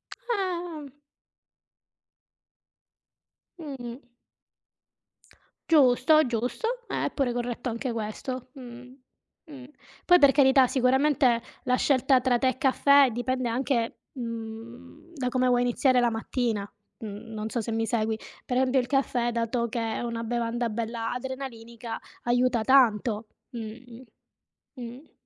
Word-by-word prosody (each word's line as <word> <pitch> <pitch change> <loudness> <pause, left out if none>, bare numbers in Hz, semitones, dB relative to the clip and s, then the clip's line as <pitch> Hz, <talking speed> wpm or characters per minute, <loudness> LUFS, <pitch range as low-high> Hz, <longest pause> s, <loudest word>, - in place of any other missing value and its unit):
Eh. 355 - -4 2.6
Mh. 265 -6 -7 1.7
Giusto, 300 0 +5
giusto 355 - -2
è - - -2
pure 265 -4 0
corretto 245 0 -3
anche 240 +2 -3
questo, 235 +3 -5
mh, 250 -2 -11 0.6
mh. 270 -3 -10 0.4
Poi 355 0 +7
per 280 -4 +6
carità 265 -2 +5
sicuramente 260 -1 +2 0.2
la 250 - +2
scelta 260 -1 +3
tra 245 -2 +2
tè 260 - +2
e 255 - 0
caffè 280 0 +5
dipende 245 +1 -2
anche, 240 -1 -1 0.2
mhmm, 235 +5 -8
da 260 -3 -2
come 255 0 +1
vuoi 245 0 +3
iniziare 250 +1 +2
la 240 -1 +3
mattina. 225 -2 -2 0.3
Mhmm, 220 +1 -8
non 215 0 -4
so 235 - -2
se 225 +1 -3
mi 225 0 0
segui, 220 -1 -1 0.3
per 250 - -2
esempio 260 0 +3
il 245 - -2
caffè 250 -3 0
dato 235 +1 -1
che 235 +1 -4 0.2
è - - -3
una 235 -1 -3
bevanda 235 0 -1
bella 225 +1 -3
adrenalinica 235 -3 -6 0.2
aiuta 245 -1 +2
tanto, 225 -4 +3 0.2
mh,mh, 235 +1 -9 0.8
mh. 245 +6 -10
245 Hz, 120 wpm, -27 LUFS, 230-265 Hz, 2.6 s, Poi